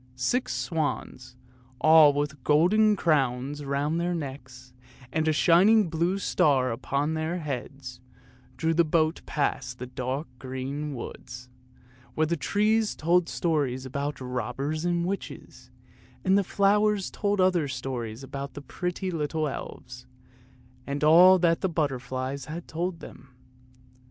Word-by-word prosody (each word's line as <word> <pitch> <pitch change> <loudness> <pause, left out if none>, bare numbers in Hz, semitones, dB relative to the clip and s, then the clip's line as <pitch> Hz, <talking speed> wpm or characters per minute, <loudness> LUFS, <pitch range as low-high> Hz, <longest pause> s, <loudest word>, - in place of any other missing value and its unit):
Six 185 - -1
swans, 150 -6 -3 0.4
all 155 -2 +7
with 145 -1 -3
golden 205 +8 +4
crowns 145 -4 0
round 145 +4 -1
their 175 0 -1
necks, 130 -4 -8 0.4
and 160 0 0
a - - +4
shining 180 +5 +4
blue 170 +4 0
star 135 -9 +2
upon 140 +6 -2
their 160 +2 -2
heads, 135 -4 -6 0.6
drew 165 0 +1
the 170 +1 +4
boat 160 0 +1
past 125 -4 -2
the 125 - -6
dark 130 +4 -4
green 135 +3 -5
woods, 125 +1 -9 0.7
where 155 - +2
the 170 +2 0
trees 210 +7 +1
told 170 +2 +2
stories 140 -6 -1
about 140 +2 -4
robbers 130 +5 -3
and 175 -1 0
witches; 195 +2 -6 0.6
and 190 +1 +4
the 200 - +3
flowers 205 +1 +2
told 205 -1 -1
other 180 -5 +3
stories 125 -2 -5
about 140 +1 -7
the 145 - -7
pretty 180 +6 -4
little 155 -1 -1
elves, 125 -2 -8 0.8
and 140 +1 -3
all 175 +5 +8
that 170 -2 +2
the 190 - 0
butterflies 135 -3 -3
had 165 +4 -7
told 170 +1 -3
them. 125 -1 -13
150 Hz, 130 wpm, -27 LUFS, 130-175 Hz, 0.8 s, all